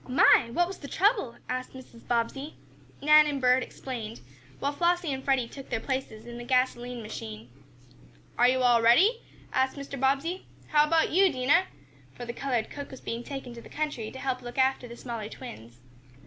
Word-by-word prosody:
"My! 250 -1 +5
What 350 +8 +2
was 375 0 -8
the 280 - -8
trouble?" 385 - +1
asked 255 0 -4
Mrs. 250 -3 -13
Bobbsey. 245 +5 -1 0.5
Nan 300 +1 +7
and 285 -2 -2
Bert 255 0 +4
explained, 235 -4 -6 0.4
while 280 - -1
Flossie 345 -1 +1
and 265 0 -5
Freddie 265 -4 +1
took 270 +2 -11
their 225 - -1
places 260 -4 -4
in 240 0 -8
the - - -6
gasoline 245 -1 0
machine. 110 - -8 0.8
"Are 245 - +5
you 255 0 +2
all 240 -2 +5
ready?" 370 - +5 0.3
asked 260 +2 +1
Mr. 280 -1 -6
Bobbsey. 280 +8 0 0.2
"How 300 0 +4
about 325 +1 +2
you, 375 +2 +5
Dinah?" 285 +7 +3 0.5
for 245 - -7
the 235 - -5
colored 245 -4 -2
cook 285 -1 -7
was 265 - -10
being 230 +1 -4
taken 270 -3 -7
to 235 - -10
the - - -14
country 295 -8 -3
to 265 - -10
help 260 -1 -2
look 240 0 -9
after 260 -1 +2
the 235 0 -10
smaller 230 -4 -5
twins. 115 - -10
260 Hz, 190 wpm, -28 LUFS, 240-285 Hz, 0.8 s, Nan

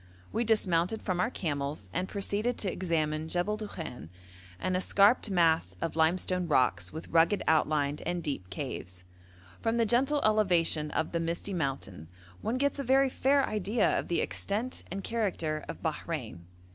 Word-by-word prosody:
We 235 - 0
dismounted 210 -3 +2
from 185 -3 -1
our 225 - +2
camels, 145 - -3
and 185 +2 -2
proceeded 205 +4 -1
to 195 - -1
examine 155 -3 -1
Jebel 180 +5 0
Dukhan, 160 - -7 0.5
an 185 - -1
escarped 200 +5 +4
mass 165 - +2
of 165 - -3
limestone 175 +2 +1
rocks 95 - +2
with 160 - -8
rugged 170 +5 +3
outline 150 -2 +2
and 175 0 -2
deep 135 - -4
caves. 90 0 -6 0.6
From 225 +1 0
the 230 - +3
gentle 265 +6 +2
elevation 175 -8 +3
of 160 - -1
the 170 - 0
misty 170 +4 -2
mountain 135 - -3 0.3
one 240 - -1
gets 285 +1 0
a - - -1
very 265 +1 +3
fair 275 +2 +3
idea 210 +1 +1
of - - -5
the 170 - +1
extent 225 +6 -2
and 195 +2 -5
character 170 -9 -1
of - - -7
Bahrein. 85 0 -4
175 Hz, 160 wpm, -30 LUFS, 155-215 Hz, 0.6 s, escarped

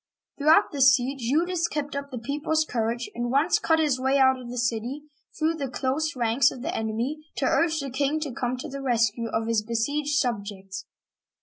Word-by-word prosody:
Throughout 305 +3 +5
this 265 -3 +6
siege, 260 +2 -3
Eudes 335 +8 +1
kept 290 -1 -4
up 280 0 -4
the 255 - -6
people's 295 +6 -1
cour 230 -5 -1
age, 240 +1 -4
and 240 0 -3
once 285 +7 +3
cut 320 - +2
his 295 -5 +1
way 265 +2 +2
out 260 -1 +4
of 245 -1 -9
the 245 - -6
city, 240 +4 -2 0.3
through 315 +1 +1
the 280 -5 -4
close 280 +5 -1
ranks 240 +2 +3
of 250 - -9
the - - -2
enemy, 225 +7 -2 0.2
to - - -1
urge 320 -1 +2
the 275 -2 -4
king 280 +4 0
to 295 -3 -3
come 245 +1 -2
to 250 - -6
the 275 +1 -6
rescue 230 -3 +1
of 225 0 -1
his 230 -1 +1
besieged 280 +7 -1
subjects. 200 -6 -3
265 Hz, 205 wpm, -26 LUFS, 235-295 Hz, 0.3 s, this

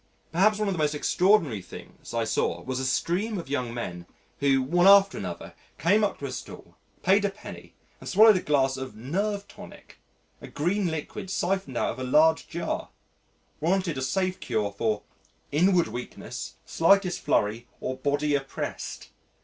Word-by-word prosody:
Perhaps 200 +6 +3
one 210 -1 -1
of 195 - 0
the 175 - -4
most 150 -1 +1
extraordinary 165 - +2
things 90 - -12
I 115 -1 0
saw - - -1
was 130 0 -3
a 130 - -2
stream 195 - 0
of 165 -6 -7
young 125 -4 -1
men 90 -7 -6 0.3
who, 135 -2 +3
one 175 +7 +3
after 195 -1 +7
another, 90 -3 -6 0.2
came 205 +6 +3
up 205 - 0
to 140 - -6
a 135 - -4
stall, 130 - -9 0.3
paid 195 +3 +4
a 200 - +2
penny 195 +2 -11 0.2
and - - -8
swallowed 215 +2 +7
a - - -2
glass 135 -4 +1
of 130 0 -6
"nerve 200 - -2
tonic" - - -14 0.4
a - - -9
green 185 +6 0
liquid 160 +3 -5
syphoned 190 -8 -1
out - - +1
of 125 - -9
a - - -3
large 155 +5 +3
jar - - -3 0.7
warranted 175 +1 0
a 130 - -4
safe 185 +8 -1
cure 110 -4 -1
for 105 +1 -1 0.5
"Inward 175 +4 +3
weakness, 120 +3 -7
slightest 180 +2 +3
flurry 110 +4 0
or 130 - -3
body 145 +2 0
oppressed." 135 -1 -4
150 Hz, 170 wpm, -26 LUFS, 130-190 Hz, 0.7 s, after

